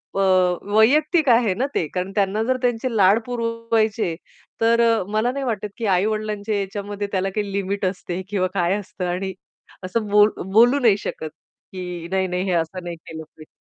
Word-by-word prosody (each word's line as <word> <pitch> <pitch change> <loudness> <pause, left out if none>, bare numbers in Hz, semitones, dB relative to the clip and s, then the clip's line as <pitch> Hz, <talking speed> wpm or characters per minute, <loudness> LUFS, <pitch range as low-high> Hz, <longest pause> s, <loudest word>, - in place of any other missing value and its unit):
अ, - - 0 0.6
वैयक्तिक 300 +7 +4
आहे 230 -4 +4
ना 250 +7 -1
ते, 160 - 0
कारण 185 +1 -2
त्यांना 205 +2 +1
जर 255 +2 0
त्यांचे 245 -1 -1
लाड 200 +2 +5
पुरवायचे, 230 -5 -1 0.5
तर 230 +1 +4
अ, 230 -4 +3
मला 220 +3 +1
नाही 275 0 -4
वाटत, 210 -3 -2
की 230 - -3
आई-वडिलांच्या 215 +1 -1
याच्यामध्ये 205 +1 -4
त्याला 195 0 0
काही 205 -2 -2
लिमिट 200 0 -2
असते 185 -1 -3
किंवा 185 -3 0
काय 175 -1 +1
असतं. 200 -2 -6
आणि 185 +2 -3 0.5
असं 210 +3 -2
बोलू 210 -2 +4
बोलू 245 +6 +6
नाही 220 -6 +4
शकत, 160 -5 -5 0.4
की 180 -2 -6
नाही-नाही 185 -1 0
हे - - +1
असं 170 +2 -2
नाही 175 -1 -5
केलं 160 0 -10
पाहिजे. 155 0 -16
205 Hz, 170 wpm, -22 LUFS, 185-230 Hz, 0.6 s, बोलू